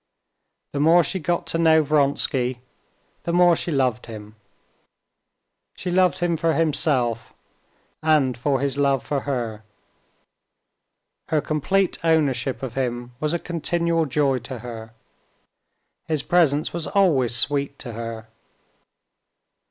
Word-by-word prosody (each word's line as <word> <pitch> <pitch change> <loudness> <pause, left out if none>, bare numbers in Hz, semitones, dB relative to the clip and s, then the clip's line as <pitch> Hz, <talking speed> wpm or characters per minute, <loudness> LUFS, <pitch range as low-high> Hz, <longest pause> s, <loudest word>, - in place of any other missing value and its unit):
The 140 - -2
more 165 +4 +5
she 190 - -3
got 175 +1 -1
to 165 - -1
know 160 -1 +5
Vronsky, 140 -4 +1 0.6
the 170 - -3
more 175 0 +5
she 170 - -4
loved 130 -6 0
him. 105 -1 -10 1.4
She 180 - -4
loved 185 0 +3
him 175 -2 0
for 165 +1 +1
himself, 135 -7 0 0.7
and 150 -5 +2
for 135 +2 0
his 140 0 -1
love 140 -2 +1
for 145 - -1
her. 120 -6 -4 1.6
Her 155 - +1
complete 175 +6 0
ownership 135 -6 +1
of 130 - -4
him 120 -2 -3
was 150 0 -1
a - - +2
continual 170 0 -1
joy 140 -2 +1
to 125 +1 -8
her. 115 -2 -8 1.1
His 155 -3 -1
presence 155 -4 +2
was 170 -2 -4
always 145 - +2
sweet 140 +3 0
to 120 - -8
her. 115 -1 -6
145 Hz, 125 wpm, -23 LUFS, 125-165 Hz, 1.6 s, more